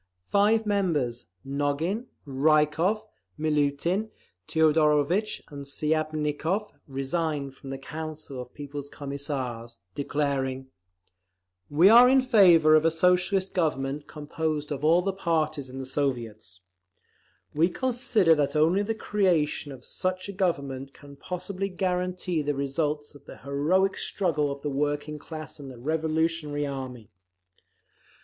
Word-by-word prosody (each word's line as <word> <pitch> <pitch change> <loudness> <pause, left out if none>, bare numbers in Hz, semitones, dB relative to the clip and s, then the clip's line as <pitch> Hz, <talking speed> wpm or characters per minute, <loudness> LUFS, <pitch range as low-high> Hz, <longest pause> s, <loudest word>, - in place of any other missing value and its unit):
Five 215 +2 +3
members—Nogin, 145 - -1 0.2
Rykov, 155 +8 +2 0.4
Miliutin, 155 +7 0 0.4
Teodorovitch 160 +5 +2
and 140 -2 -8
Shiapnikov—resigned 150 -1 -2
from 135 - -11
the 135 - -4
Council 155 -1 -7
of 125 - -11
People's 145 -1 -7
Commissars, 135 -5 -5 0.2
declaring: 135 -2 -2 1.0
We 160 +6 +5
are 240 +4 +9
in 265 0 +5
favour 180 -11 +6
of 155 0 +6
a 165 - +5
Socialist 180 +3 +2
Government 145 -4 -1
composed 150 0 -3
of 145 0 -4
all 170 +3 +4
the 195 0 -1
parties 155 -6 -1
in 130 - -9
the 135 - -5
Soviets. 120 -9 -3 0.9
We 165 +4 +3
consider 235 -6 +2
that 150 -1 0
only 165 +6 +3
the 220 +2 -2
creation 175 -9 0
of 130 -2 -11
such 185 +1 -2
a - - -4
Government 140 -8 -2
can 140 -1 -13
possibly 185 +5 -4
guarantee 180 -2 -1
the 145 0 -1
results 145 +2 -2
of 145 -1 -16
the - - -11
heroic 155 +8 +1
struggle 150 -7 0
of 140 0 -7
the 150 - -1
working 145 +2 -2
class 155 0 -8
and 140 -2 -8
the 130 - -10
revolutionary 160 +1 -1
army. 130 -5 -6
150 Hz, 120 wpm, -27 LUFS, 140-180 Hz, 1.0 s, are